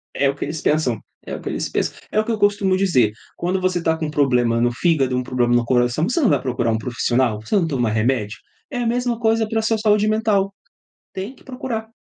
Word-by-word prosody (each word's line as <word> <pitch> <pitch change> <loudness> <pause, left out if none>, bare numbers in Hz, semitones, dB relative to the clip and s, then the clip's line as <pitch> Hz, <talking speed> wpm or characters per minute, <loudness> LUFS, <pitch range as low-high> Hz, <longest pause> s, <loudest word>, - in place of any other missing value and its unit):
É 140 - +2
o 135 - -2
que - - -4
eles 155 +1 -5
pensam, 140 -8 +1 0.3
é - - -5
o - - -8
que - - -5
eles - - -3
pensam. - - -1 0.2
É 215 - +2
o 215 - +1
que 235 - -1
eu 220 - -2
costumo 205 -2 +2
dizer, 150 - +3 0.3
quando 185 +2 -1
você 185 -1 0
tá 160 -1 +1
com 160 - -3
um - - -5
problema 125 -5 +2
no 120 +1 +2
fígado, 135 -2 +1
um 125 - 0
problema 125 -1 +1
no 120 -1 +2
coração, 125 +6 +2
você 250 - 0
não 255 - +4
vai - - +2
procurar 120 -3 -1
um 110 - +1
profissional? 120 -1 0
Você 110 - -2
não 180 -5 +3
toma 125 -7 0
remédio? 110 0 0 0.3
É 250 - -3
a 240 - 0
mesma 245 0 0
coisa 225 -1 +2
para 225 +1 0
a - - +1
sua 220 0 +1
saúde 210 -1 +2
mental, 215 -3 +1 0.6
tem 195 +8 -5
que - - -21
procurar. 250 -4 -5
160 Hz, 250 wpm, -21 LUFS, -, 0.6 s, não